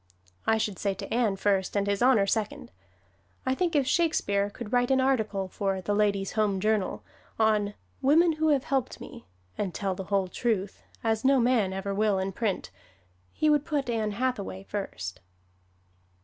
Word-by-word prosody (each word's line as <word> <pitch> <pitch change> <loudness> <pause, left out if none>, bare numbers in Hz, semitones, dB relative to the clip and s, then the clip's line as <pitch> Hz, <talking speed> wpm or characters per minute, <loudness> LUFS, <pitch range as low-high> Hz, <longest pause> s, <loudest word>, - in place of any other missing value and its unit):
I 220 - +4
should 210 -3 -2
say 200 -2 0
to 195 +1 -6
Ann 230 -4 +2
first 195 -1 0
and 200 - +1
His 200 +1 -1
Honor 245 -5 +5
second. 210 +1 -2 0.7
I 260 - +2
think 340 +3 0
if 280 -2 +3
Shakespeare 230 -10 +1
could 220 +1 -8
write 245 0 +3
an 265 0 +3
article 220 -7 +1
for 195 0 -2
"The 205 +2 -2
Ladies' 200 -2 +1
Home 210 -3 +1
Journal" 210 -1 0 0.3
on 210 -2 +2 0.3
"Women 320 +6 +5
Who 315 0 +1
Have 285 -4 +3
Helped 270 -5 -1
Me," 240 -3 -11 0.3
and 195 -4 -2
tell 195 -2 -1
the 190 +1 -6
whole 195 -1 +1
truth 200 -1 -2 0.2
(as 225 -1 0
no 270 0 +5
man 235 -5 +2
ever 195 +1 -3
will 210 0 +2
in 190 +1 -1
print), 195 - -2 0.6
he 310 - 0
would 295 -2 +4
put 285 -5 -1
Ann 215 -2 -1
Hathaway 220 -5 -2
first. 90 - -5
210 Hz, 175 wpm, -28 LUFS, 195-255 Hz, 0.7 s, Honor